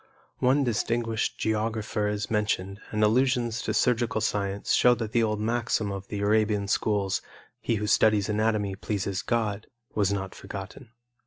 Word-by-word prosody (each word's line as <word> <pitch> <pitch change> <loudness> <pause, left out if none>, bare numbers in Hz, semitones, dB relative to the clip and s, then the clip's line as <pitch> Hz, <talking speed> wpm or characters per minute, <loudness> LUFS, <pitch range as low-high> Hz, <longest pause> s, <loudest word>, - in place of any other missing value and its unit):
One 135 +3 +3
distinguished 115 -2 -1
geographer 110 -1 -1
is 105 +1 -3
mentioned, 105 -2 -1
and 105 0 0
allusions 120 0 +2
to - - -2
surgical 120 0 +2
science 100 -2 -1
show 125 0 +5
that 110 -2 -4
the 120 - +3
old 105 -2 0
maxim 110 -2 0
of 100 0 -6
the 100 -1 -4
Arabian 105 -1 +2
schools, 100 -2 0 0.4
"He 115 - 0
who 105 0 -2
studies 105 -1 +3
anatomy 105 -2 0
pleases 100 -1 -2
God," 110 -3 -1 0.3
was 100 -2 +1
not 95 -2 -3
forgotten. 100 +6 -8
105 Hz, 150 wpm, -27 LUFS, 100-115 Hz, 0.4 s, show